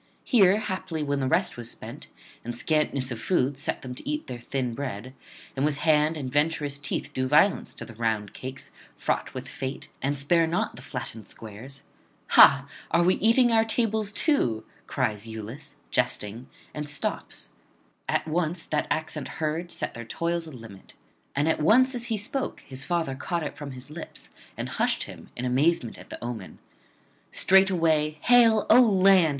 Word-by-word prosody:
Here 200 -5 +5
haply 185 -6 -3
when 145 -1 -1
the 130 - 0
rest 130 - +2
was 120 -1 -6
spent, - - -9 0.4
and 120 +1 -5
scantness 140 -2 0
of 120 - -4
food 140 -3 +1
set 140 - -3
them 125 -1 -6
to 200 - -7
eat 300 +1 -2
their 125 - -6
thin 125 0 -3
bread, 130 -2 -5 0.4
and 135 - -1
with 150 -1 +1
hand 155 +1 +3
and 130 -4 -4
venturous 145 -1 0
teeth 145 0 -4
do 130 -1 -1
violence 155 +9 +3
to - - -8
the 115 - -11
round 110 -3 -1
cakes 130 +1 -8 0.2
fraught - - -2
with - - -5
fate 130 +1 -6
and 140 +1 0
spare 165 +4 +3
not 165 +2 -1
the - - -10
flattened 110 -1 -7
squares: 115 +6 -8 0.5
Ha! 135 0 +7 0.2
Are 170 +1 +3
we 180 +2 +5
eating 235 +3 +4
our 225 -1 +5
tables 220 -2 +1
too? 165 - +1 0.2
cries 110 -5 -1
Iülus 110 +5 -7 0.2
jesting, 110 +5 -1 0.2
and 150 -1 -5
stops. 145 - -4 0.6
At - - 0
once 165 +1 -1
that 150 -1 -1
accent 160 0 -2
heard 160 +2 -2
set - - -4
their 115 - -7
toils 170 +7 -2
a - - -9
limit; 110 -7 -12 0.4
and 145 +3 +1
at 160 - +1
once 255 - +5
as 240 -1 -4
he 225 -2 -1
spoke 255 +6 -3
his 135 -1 -6
father 165 -3 -1
caught 170 +5 -3
it 150 - -5
from 145 -1 -7
his 130 +2 -10
lips 160 +1 -10 0.3
and - - -3
hushed - - 0
him, - - -11
in 125 - -4
amazement 130 0 +1
at - - -13
the - - -8
omen. 120 -5 -6 0.7
Straightway 165 -5 +3
'Hail, 230 -3 +5
O 250 - +8
land!' 195 -6 +5
150 Hz, 175 wpm, -26 LUFS, 130-180 Hz, 0.7 s, O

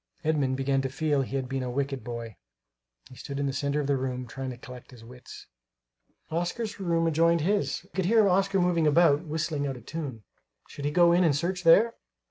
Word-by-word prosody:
Edmund 145 -4 0
began 135 0 +1
to 135 - -3
feel 145 +1 0
he 135 +1 -4
had 130 -2 -2
been 135 0 -3
a 125 - -3
wicked 135 -1 -3
boy. 115 -2 -6 0.7
He 130 - -14
stood 140 +2 -6
in 140 - 0
the 135 - -1
centre 140 +1 -1
of 145 - -1
the 140 0 +1
room, 130 -1 -3
trying 130 +2 -6
to 125 - -7
collect 125 -1 -12
his 120 -3 -14
wits. 125 +2 -12 0.9
Oscar's 200 +6 -3
room 170 -3 0
adjoined 165 +1 +3
his; 200 +5 0
he - - -23
could 190 -2 -2
hear 220 +1 +4
Oscar 195 +1 +2
moving 175 -3 +2
about, 150 -1 +4
whistling 155 -2 -2
out 135 -2 -4
of 120 - -14
tune. 140 -9 -6 0.4
Should 140 - -8
he 145 - 0
go 170 +1 +5
in 175 +1 +4
and 155 -5 +3
search 180 +5 -2
there? 210 +8 +6
145 Hz, 215 wpm, -27 LUFS, 130-170 Hz, 0.9 s, there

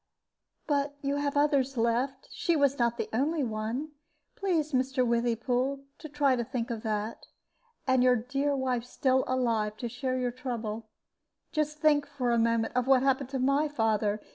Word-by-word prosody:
"But 285 -1 0
you 280 +1 0
have 285 0 -1
others 275 -3 +2
left. 245 +4 0
She 340 - 0
was 280 -2 +2
not 235 0 +1
the - - -2
only 290 +6 +1
one. 230 +6 -3 0.4
Please, 335 -6 0
Mr. 260 -1 +1
Withypool, 245 +3 0 0.2
to 310 - -8
try 285 -2 +2
to 240 - -1
think 240 -1 -3
of 225 -2 -4
that. 215 0 -3 0.6
And 260 -1 +3
your 250 0 +5
dear 275 +5 -1
wife 255 -3 -1
still 260 +1 +1
alive 225 -5 0
to 240 - -4
share 255 +2 -2
your 250 -1 -1
trouble. 230 -3 -5 0.6
Just 305 -1 -1
think 295 -2 +4
for 265 -4 -1
a 235 - +3
moment 230 0 +1
of 250 0 +1
what 265 -1 +5
happened 270 -1 +1
to 270 - -3
my 275 +4 +2
father. 220 -6 0
255 Hz, 170 wpm, -29 LUFS, 235-280 Hz, 0.6 s, your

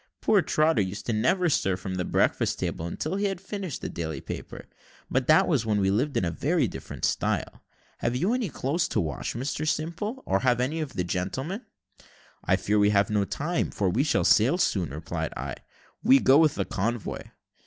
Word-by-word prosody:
Poor 205 - +4
Trotter 155 -7 +2
used 100 +4 -3
never 125 - +2
to - - +4
stir 95 -8 +1
from 95 0 -5
the 90 -1 -1
breakfast - - +1
table 80 - -3
until 155 - -3
he 205 - 0
had 195 -3 -1
finished 190 -5 -5
the - - -3
daily 80 -4 -4
paper - - -7 0.5
but 130 -1 +1
that 170 +5 +5
was 145 -9 +2
when 105 -2 +1
we 95 -1 +2
lived 135 +8 0
in 90 - +1
very 150 - +1
different - - -5
style. - - -1 0.4
Have 120 +1 -1
you 185 - +1
any 250 -6 -1
clothes 150 +5 -1
to - - -1
wash, 80 +4 -3
Mr 135 +5 -3
Simple, 175 - -2
or 95 - +1
have 125 0 +2
any 140 +6 -1
of 150 -4 -5
the 90 - -1
gentlemen?" 130 - -3 0.8
"I - - +3
fear 105 +1 +1
we 105 0 +5
have 100 0 +2
no 105 -1 +2
time, 165 - -1
we 100 +6 +2
sail 150 - +1
too 120 +10 +4
soon," 95 - +1
replied 80 +2 -4
I; - - -5 0.4
"we 135 - +6
go 135 +2 +5
with 155 -2 +4
the - - -1
convoy." 115 +3 -2
125 Hz, 195 wpm, -27 LUFS, 100-160 Hz, 0.8 s, we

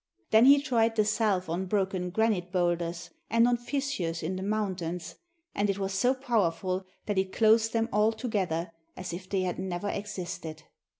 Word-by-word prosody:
Then 220 +2 +7
he 280 +1 +8
tried 230 -5 +1
the 215 -1 +3
salve 210 -4 +1
on 175 +3 -2
broken 190 -2 0
granite 195 -3 0
boulders 175 -2 -1 0.2
and 230 +2 +4
on 245 - +3
fissures 240 - -3
in 180 +4 -2
the 185 - -4
mountains, 185 -5 -2 0.4
and 205 0 0
it 195 - 0
was 195 -1 -2
so 245 +7 +2
powerful 190 -7 0 0.2
that 205 -2 0
it 190 0 -1
closed 225 +1 +4
them 225 -1 +1
all 210 +2 +4
together 190 -8 -2 0.3
as 180 -2 -5
if 185 +2 -7
they 195 -2 0
had 180 -1 -2
never 185 +1 -3
existed. 180 -6 -5
195 Hz, 175 wpm, -29 LUFS, 180-225 Hz, 0.4 s, he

